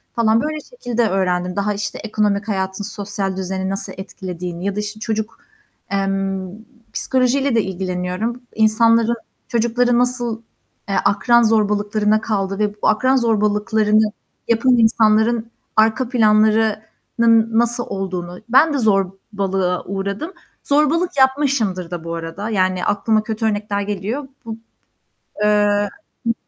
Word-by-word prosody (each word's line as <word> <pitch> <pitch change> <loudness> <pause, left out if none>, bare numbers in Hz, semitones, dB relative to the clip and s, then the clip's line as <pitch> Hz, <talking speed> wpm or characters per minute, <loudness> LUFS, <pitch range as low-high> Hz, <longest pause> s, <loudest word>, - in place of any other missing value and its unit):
falan 225 -1 +3
böyle 310 +1 -2
şekilde 245 - -2
öğrendim. 180 -1 0
Daha, 205 +1 0
işte, 205 0 -4
ekonomik 210 -1 0
hayatın 190 -1 -2
sosyal 200 -2 -4
düzeni 190 0 -3
nasıl 195 0 -4
etkilediğini 180 -2 -6
ya 200 -1 -1
da, - - -2
işte, 210 +1 -5
çocuk, 220 0 -3 0.5
emm, 195 -1 -1 0.4
psikolojiyle 260 +1 +1
de 225 - +4
ilgileniyorum. 185 +5 -3
İnsanların 230 +1 +3 0.3
çocukları 235 +1 +1
nasıl, 240 -2 0 0.5
eee, 195 - 0
akran 235 +3 +4
zorbalıklarına 210 -1 +2
kaldı 195 -2 -2
ve 210 -1 0
bu 210 - -2
akran 255 +5 +3
zorbalıklarını 215 -2 +2 0.4
yapan 240 +2 +3
insanların 225 0 +3 0.2
arka 220 +3 +3
planlarının 220 0 +2
nasıl 240 +1 0
olduğunu. 180 -2 -4
Ben 285 +6 +5
de 285 - 0
zorbalığa 195 -3 0
uğradım, 200 - -4 0.3
zorbalık 305 +5 +2
yapmışımdır 265 - +1
da 175 -2 -5
bu 165 0 -4
arada. 165 +6 -5
Yani 185 -3 0
aklıma 215 +1 +1
kötü 220 0 -3
örnekler 205 -1 -1
geliyor. 210 +7 -3 0.2
Bub 225 -1 -6 0.8
Eee, 205 -1 +3 0.4
hı 230 - +3
215 Hz, 120 wpm, -19 LUFS, 195-230 Hz, 0.8 s, Ben